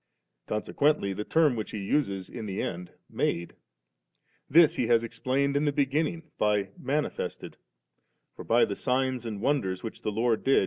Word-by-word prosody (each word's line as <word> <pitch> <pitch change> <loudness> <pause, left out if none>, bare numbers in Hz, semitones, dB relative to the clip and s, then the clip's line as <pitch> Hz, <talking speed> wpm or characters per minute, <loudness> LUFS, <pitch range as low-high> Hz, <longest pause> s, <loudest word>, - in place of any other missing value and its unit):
Consequently 110 0 +1
the 105 - -4
term 155 0 +3
which 110 -2 -4
he - - -5
uses 100 -3 -1
in 115 -3 -7
the 95 -1 -4
end, 90 +1 -4 0.2
'made^' 85 0 -1 1.0
this 165 +1 +6
He 120 - 0
has 115 -1 +4
explained 130 +4 -1
in 145 +2 +2
the 145 - +2
beginning 150 +3 -1
by 105 -2 +2
'manifested,' 145 +3 -3 0.8
for - - -8
by 120 +1 +4
the 100 - -4
signs 130 -1 0
and 105 -2 -5
wonders 95 -11 0
which 115 - -7
the - - -1
Ix)rd 110 +1 0
did. 135 - +5
120 Hz, 165 wpm, -28 LUFS, 105-140 Hz, 1.0 s, this